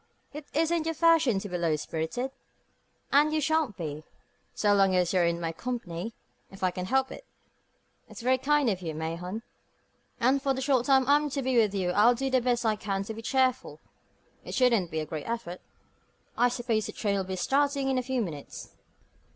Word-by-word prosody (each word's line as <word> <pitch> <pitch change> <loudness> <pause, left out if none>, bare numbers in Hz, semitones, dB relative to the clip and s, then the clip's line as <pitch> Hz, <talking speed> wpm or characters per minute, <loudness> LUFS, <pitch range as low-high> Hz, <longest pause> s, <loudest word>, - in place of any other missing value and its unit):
It 300 0 -8
isn't 325 +1 +1
your 325 - -1
fashion 320 - +4
to 195 - -4
be 180 -2 -4
low 165 -2 +1
spirited, 160 - -3 0.8
and 295 +2 +4
you 310 - +1
shan't 310 -6 0
be, 155 -2 -5 0.5
so 205 -1 +2
long 195 -2 +4
as 180 0 +1
you're 180 -2 +3
in 170 0 -1
my 165 -1 -2
company 225 -1 -5 0.3
if 195 0 -11
I 185 - +3
can 180 +1 -5
help 265 +5 +1
it." - - -9 0.9
"It's - - -10
very 260 +1 +3
kind 290 +1 +2
of 185 -2 -4
you, 160 -3 -4
Mahon; 170 +7 -4 0.8
and 265 +3 +3
for 270 -1 0
the 265 - -3
short 260 -3 +1
time 265 -2 +4
I'm 295 +1 +3
to 275 -1 -3
be 260 0 0
with 215 -4 +3
you 180 -2 0
I'll 215 +6 +5
do 270 +2 -2
the 260 -1 +3
best 240 -1 0
I 220 -1 +2
can 195 -2 -2
to 220 - -6
be 225 - -8
cheerful. 260 +1 0 0.6
It - - -6
shouldn't 235 -9 +3
be 160 0 -2
a - - -4
great 155 +5 -6
effort. 225 -7 -4 0.7
I 245 - +3
suppose 235 -3 -1
the - - -7
train 205 -2 -1
will 195 - 0
be 190 0 -4
starting 275 +6 +1
in 265 -1 +1
a - - 0
few 255 -1 -1
minutes?" 150 -7 -8
235 Hz, 205 wpm, -28 LUFS, 185-265 Hz, 0.9 s, I'll